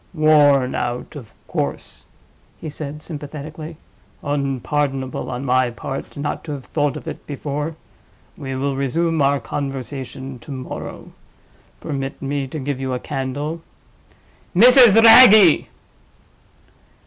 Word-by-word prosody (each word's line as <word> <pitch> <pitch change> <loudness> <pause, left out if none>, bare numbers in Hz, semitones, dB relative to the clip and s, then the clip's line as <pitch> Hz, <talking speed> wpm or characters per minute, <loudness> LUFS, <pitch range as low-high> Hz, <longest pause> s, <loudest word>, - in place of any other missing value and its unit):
"Worn 145 -4 +4
out, 120 +4 -4
of 120 -9 -10 0.2
course!" - - -5 0.5
he 155 - -7
said, 150 0 -7
sympathetically. 155 +1 -8 0.5
"Unpardonable 140 -1 -2
on 125 +2 -5
my 130 -1 +2
part 135 +4 -7
not 145 +1 -4
to 150 - -5
have 135 -3 -8
thought 145 -3 -1
of - - -11
it - - -8
before. 150 +2 -4 0.6
We 135 -7 -6
will 135 +1 -2
resume 160 +4 0
our 140 0 +2
conversation 135 -2 -6
to 115 - -16
morrow. 130 -1 -7 0.7
Permit 135 -1 -5
me 140 0 -3
to 145 - -7
give 140 -1 -4
you 130 -1 -2
a - - -4
candle. 145 +6 -4 0.9
Mrs. 240 +1 +7
Wragge!" 220 -7 +8
140 Hz, 120 wpm, -20 LUFS, 135-155 Hz, 0.9 s, Wragge